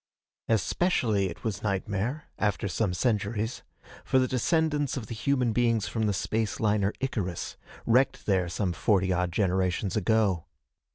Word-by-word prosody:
Especially 110 - +1
was 110 -4 -1
it - - -15
nightmare 105 +7 -1 0.2
after 105 -1 0
some 100 +1 0
centuries 105 +3 -1 0.4
for - - +2
the 130 0 +3
descendants 145 +2 +1
of 120 - -4
the 115 - -6
human 125 0 +1
beings 115 -3 +2
from 110 0 -1
the - - +2
space 110 +3 -1
liner 105 -2 +2
Icarus, 100 -10 -3 0.3
wrecked 125 +3 +2
there 95 -4 +1
some 90 0 -1
forty 95 +2 +2
odd 90 0 0
generations 95 +1 0
ago. 105 -4 +2
105 Hz, 145 wpm, -28 LUFS, 95-120 Hz, 0.4 s, the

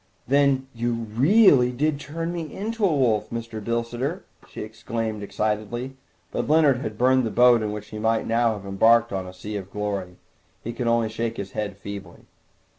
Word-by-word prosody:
"Then 140 0 +3
you 120 0 -1
really 125 - +4
did 145 +3 0
turn 165 +4 -4
me 165 -4 -5
into 225 +2 -4
a - - +6
wolf, 125 - +1
Mr. 115 -2 -5
Bilsiter?" 120 - -2 0.3
she - - -6
exclaimed 110 0 -4
excitedly. 110 +5 -3 0.4
But - - -2
Leonard 150 -4 +5
had 110 -4 -5
burned 130 +2 +4
the 115 - -1
boat 120 +1 +5
in 105 -1 -2
which 105 0 -7
he 110 - -7
might 110 +1 +1
now 115 0 +2
have 100 -2 -8
embarked 115 +3 +4
on 95 -1 -3
a - - -8
sea 105 +3 -7
of 95 -1 -7
glory. 100 -3 -4 0.5
He 115 - -4
could 120 0 -3
only 115 -1 +2
shake 115 +1 -3
his 100 -1 -5
head 105 -2 -4
feebly. 100 0 -9
115 Hz, 185 wpm, -24 LUFS, 105-130 Hz, 0.5 s, a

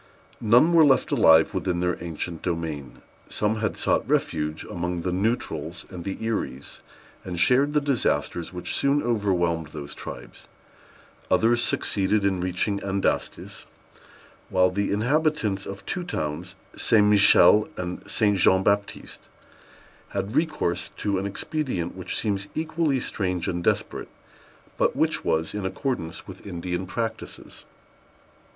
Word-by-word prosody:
None 120 +10 +5
were 165 -1 +7
left 135 -3 +3
alive 80 0 +5
within 90 -2 -1
their 90 0 -1
ancient 85 0 -4
domain. 80 -5 -4 0.3
Some 105 +1 0
had 110 -1 -2
sought - - 0
refuge 75 +1 0
among 90 0 -3
the 90 - -1
Neutrals 110 +7 -2
and 90 -2 -7
the 95 - -3
Eries, 85 - -4 0.4
and 90 -2 -4
shared 135 +8 +4
the 150 - +3
disasters 125 - -1
which 90 -1 -3
soon 140 +1 +2
overwhelmed 90 -8 0
those 75 -2 -8
tribes; - - -9 0.8
others 120 +1 +3
succeeded 100 +1 +1
in 95 -2 +1
reaching 90 +3 0
the 100 - -6
Andastes; 95 0 -2 0.8
while 90 0 +3
the 100 +2 -1
inhabitants 115 -2 0
of 100 0 -8
two 180 - -3
towns, 85 - -4 0.2
St. 105 -2 +3
Michel 105 +1 +6
and 90 0 -4
St. 105 -3 +2
Jean 95 +2 +4
Baptiste, 100 0 -2 0.8
had 100 +4 -4
recourse 155 - 0
to 100 -2 -1
an 100 - -2
expedient 100 - -3
which 95 -1 -3
seems 100 -2 -1
equally 155 -3 0
strange 90 -7 -2
and 85 -1 -2
desperate, - - -1 0.7
but - - +2
which - - 0
was 80 0 0
in 105 -1 -4
accordance 95 - -3
with 95 +1 -11
Indian 90 0 -4
practices. 110 +2 -6
100 Hz, 135 wpm, -25 LUFS, 90-115 Hz, 0.8 s, were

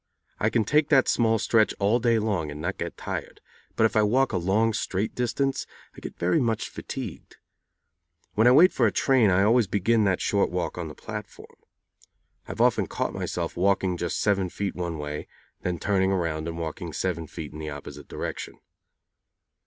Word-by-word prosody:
I 110 - +2
can 115 0 +2
take 150 +7 +2
that 135 -4 +5
small 115 -1 +3
stretch 110 0 +2
all 105 +4 +2
day 115 -1 +3
long 100 -8 -1
and 75 0 -7
not 90 +5 -3
be 85 - -2
tired, - - -6 0.4
but - - +2
if 110 - 0
I 110 - +5
walk 125 +6 +2
a - - +2
long 105 +6 +2
straight 100 +1 -2
distance 130 +3 -1 0.3
I - - -10
get - - -8
very 90 +1 +2
much 115 -3 -1
fatigued. - - -7 1.0
When 110 +3 +4
I - - +8
wait 165 +8 +7
for 120 - +3
a - - +1
train 130 -4 +3
I 95 +1 +4
always 115 +1 +4
begin 105 +4 +2
that 95 -2 +2
short 100 -1 +1
walk 90 -1 -2
on 85 -2 -4
the 75 - -9
platform. 105 -3 -9 0.9
I - - -5
have - - -3
often - - +3
caught - - -3
myself - - -3
walking 95 0 +1
just 85 0 -2
seven 100 -3 +1
feet 100 +2 -3
one 85 -2 -4
way, 75 0 -5 0.4
and 90 - -1
then - - -7
turning 95 0 +1
around 85 -4 -1
and 85 0 -5
walking 85 0 -5
seven 85 0 -2
feet 75 0 -8
in 75 - -8
the 75 0 -5
opposite 75 -1 -9
direction. - - -5
100 Hz, 195 wpm, -26 LUFS, 85-115 Hz, 1.0 s, I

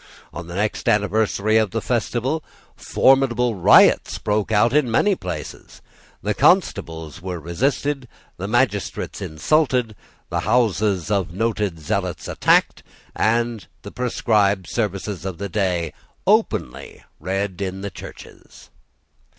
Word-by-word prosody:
On 85 - -7
the 85 - -8
next 105 +2 -1
anniversary 105 +1 +2
of 110 -2 +2
the 115 - -2
festival 125 +6 -1 0.3
formidable 125 -3 +2
riots 95 -5 +5
broke 105 0 -1
out 110 +3 +3
in 150 -4 +3
many 200 - +3
places. - - -7 0.4
The - - 0
constables 80 0 +1
were 90 -1 -5
resisted, 135 - -1 0.3
the 95 - -4
magistrates 110 -3 -1
insulted, 125 - 0 0.4
the - - 0
houses 105 -4 +1
of 100 -5 0
noted 105 -5 -1
zealots 75 - -3
attacked, - - +2 0.3
and 115 -1 0 0.2
the - - -8
prescribed 105 -6 +1
service 105 -5 -2 0.2
of 95 -3 -5
the 100 +3 -5
day 90 -5 -1 0.3
openly - - 0 0.2
read 95 +2 -3
in 95 0 -4
the 100 0 -5
churches. - - -13
105 Hz, 120 wpm, -21 LUFS, 95-120 Hz, 0.4 s, riots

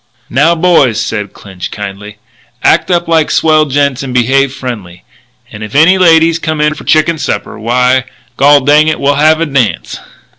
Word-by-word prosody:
"Now, 150 +7 +2
boys," 160 -9 +2
said 105 -2 -4
Clinch 95 -3 -9
kindly, 105 0 -8 0.5
"act 170 - +2
up 175 -1 0
like 160 -2 +1
swell 155 -1 +2
gents 140 -2 -1
and 130 -2 -6
behave 135 +2 +1
friendly. 115 -10 -8 0.5
And 105 - -10
if 110 +3 -8
any 175 +6 +4
ladies 165 -1 +3
come 155 -2 -3
in 150 0 +1
for - - -12
the - - -6
chicken 155 +1 +1
supper, - - -4
why, 125 +3 0 0.3
gol 145 +2 +4
dang 150 +3 +3
it, 155 - -1
we'll 140 +1 +1
have 155 +2 +2
a 165 - 0
dance!" 120 - -2
140 Hz, 180 wpm, -10 LUFS, 120-155 Hz, 0.5 s, any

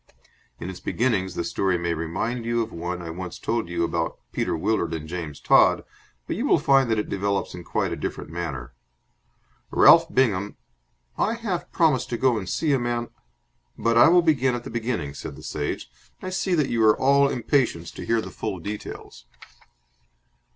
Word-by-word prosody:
In - - -6
its 95 -1 -7
beginnings 100 -7 0
the - - -1
story 95 +1 0
may 85 0 -1
remind 85 +9 -3
you 115 0 0
of 115 - -8
one 85 +1 -4
I 85 - -5
once 90 +1 -6
told 115 -5 -2
you 85 -1 -1
about 85 0 -1
Peter - - -1
Willard 85 -2 0
and 80 -1 -6
James 80 -4 -5
Todd, - - +4 0.4
but - - -3
you - - -1
will - - +5
find 135 -3 +3
that 110 - +2
it 105 - -1
develops 100 0 -1
in 90 - -8
quite - - -1
a - - -2
different - - -5
manner. 80 -9 -5 1.0
Ralph 165 0 +6
Bingham...." 105 - +1 0.6
"I 225 - +1
half 205 -7 -4
promised 155 -7 +2
to 120 - -2
go 130 0 +3
and 95 -3 -6
see 150 - +1
a 135 - +2
man 120 0 -2 0.3
" - - -44
"But 115 0 +1
I 120 - +8
will 175 +1 +5
begin 135 -6 +2
at 120 - -5
the - - -8
beginning," 115 - -2
said - - -7
the - - -12
Sage. 75 -1 -3 0.3
"I 185 - -6
see 185 -1 0
that 150 -5 +1
you 115 -1 +2
are 110 -1 +5
all 140 +1 +4
impatience 120 - 0
to - - -8
hear 115 -1 +1
the - - -8
full 105 -4 -4
details." 95 -9 -8
110 Hz, 195 wpm, -24 LUFS, 85-130 Hz, 1.0 s, I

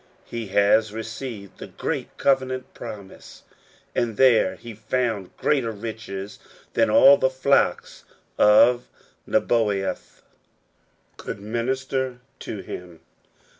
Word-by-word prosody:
He 115 -2 -6
has 100 +2 +3
received 110 -1 -7
the - - -7
great - - -5
covenant 130 -2 0
promise, 100 -2 -10 0.5
and 115 -3 -1
there 130 -4 +4
he 120 -1 -10
found 110 -3 -2
greater 135 -6 +1
riches 105 -2 -7 0.3
than - - +3
all 140 +1 +7
the 130 - +2
flocks 135 +1 +1 0.3
of 120 +4 +5 0.4
Nebaioth 105 -5 -1 0.9
could - - -6
minister 130 +4 -2 0.2
to 105 - -6
him. 90 -3 -9
115 Hz, 100 wpm, -24 LUFS, 105-130 Hz, 0.9 s, all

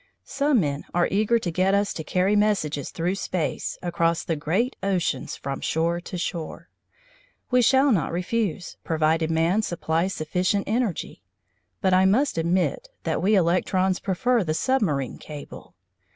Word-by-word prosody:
Some 280 -3 +2
men 145 -2 -2
are 175 - +3
eager 215 +4 +3
to 185 -6 -3
get 185 +3 +2
us 200 0 +1
to 160 - -5
carry 185 +5 +1
messages 195 -9 +1
through 175 +3 -1
space 185 -4 -3
across 170 -1 0
the 165 - -1
great 185 - -1
oceans 185 -9 -1
from 135 0 -5
shore 170 +2 0
to 180 - -7
shore. 170 -2 -5 0.8
We 250 0 +5
shall 265 +3 +4
not 175 - +1
refuse, 180 +1 -2
provided 160 0 +1
man 165 +6 +2
supplies 175 -1 -1
sufficient 180 +6 0
energy, 225 -3 -2 0.6
but 190 -3 +2
I 185 +1 +5
must 225 - +2
admit 180 - 0
that - - -1
we 210 +3 +3
electrons 185 +1 +2
prefer 230 +5 +1
the 155 -2 -1
submarine 165 - 0
cable. 150 -2 -10
185 Hz, 150 wpm, -24 LUFS, 165-210 Hz, 0.8 s, We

